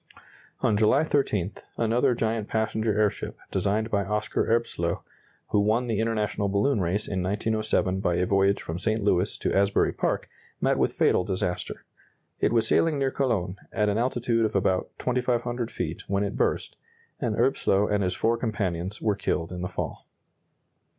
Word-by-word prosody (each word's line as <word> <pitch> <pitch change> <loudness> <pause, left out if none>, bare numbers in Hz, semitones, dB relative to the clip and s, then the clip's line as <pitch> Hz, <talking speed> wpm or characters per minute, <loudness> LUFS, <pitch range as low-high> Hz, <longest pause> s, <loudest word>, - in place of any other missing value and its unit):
On 110 - +3
July 110 +8 +4
13, 110 - 0 0.3
another 120 +3 +2
giant 110 -2 -1
passenger 110 -1 0
airship, 105 -2 0
designed 105 +4 0
by 100 -1 +2
Oscar 105 +2 -1
Erbslöh, 110 -7 0 0.5
who 105 - +3
won 110 +4 +2
the 115 -3 -1
international 105 -3 0
balloon 100 +4 +2
race 95 +4 -1
in 95 -2 -2
1907 105 -1 0
by 90 -3 +1
a 90 +1 +1
voyage 100 +1 +2
from 80 +2 -4
St. 110 +3 0
Louis 100 -2 +1
to - - -1
Asbury 100 +1 +3
Park, - - -1 0.3
met - - +1
with - - +2
fatal - - +3
disaster. 90 -1 -3 0.5
It - - +2
was 115 -1 +2
sailing 160 -3 +3
near 135 -1 +1
Cologne 105 -10 -1
at 105 -1 +1
an 105 +2 +1
altitude 120 -2 +1
of 110 - -1
about 95 -1 +1
2,500 120 -1 -1
feet 85 -6 -4
when 100 +1 +1
it 100 - -3
burst, - - -1 0.4
and - - -1
Erbslöh 100 +1 +2
and 100 -1 +2
his 90 0 -1
four 115 +1 +1
companions 100 -4 -2
were 105 - +3
killed 85 -3 -2
in 90 -1 -5
the 90 - -3
fall. - - -5
105 Hz, 165 wpm, -26 LUFS, 95-115 Hz, 0.5 s, July